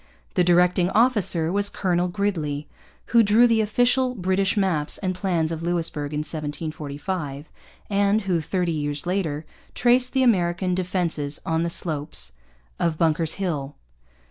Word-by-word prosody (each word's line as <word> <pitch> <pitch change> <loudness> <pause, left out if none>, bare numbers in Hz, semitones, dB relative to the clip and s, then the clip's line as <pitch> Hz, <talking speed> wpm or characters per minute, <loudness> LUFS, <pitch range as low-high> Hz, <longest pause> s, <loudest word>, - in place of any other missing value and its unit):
The 180 - +3
directing 180 +1 +3
officer 205 -8 +2
was 200 +1 +3
Colonel 180 -2 0
Gridley, 165 -7 -2 0.5
who 235 - +7
drew 220 +3 +5
the 230 -2 +3
official 245 +4 +2
British 190 0 0
maps 175 -7 0
and 185 -2 -2
plans 175 -3 -1
of 165 -1 -4
Louisbourg 165 -4 -2
in 150 0 -2
1745, 150 0 -4 0.4
and 200 +1 +2
who, 180 -5 0
thirty 175 +2 -1
years 145 -1 -3
later, 165 -5 -2 0.3
traced 250 +1 +2
the 265 -1 +3
American 180 -5 +2
defences 175 -5 -1
on 160 0 0
the 170 - 0
slopes 155 -3 0 0.5
of 165 -2 0
Bunker's 165 0 +1
Hill. 150 -8 -3
175 Hz, 140 wpm, -24 LUFS, 155-200 Hz, 0.5 s, who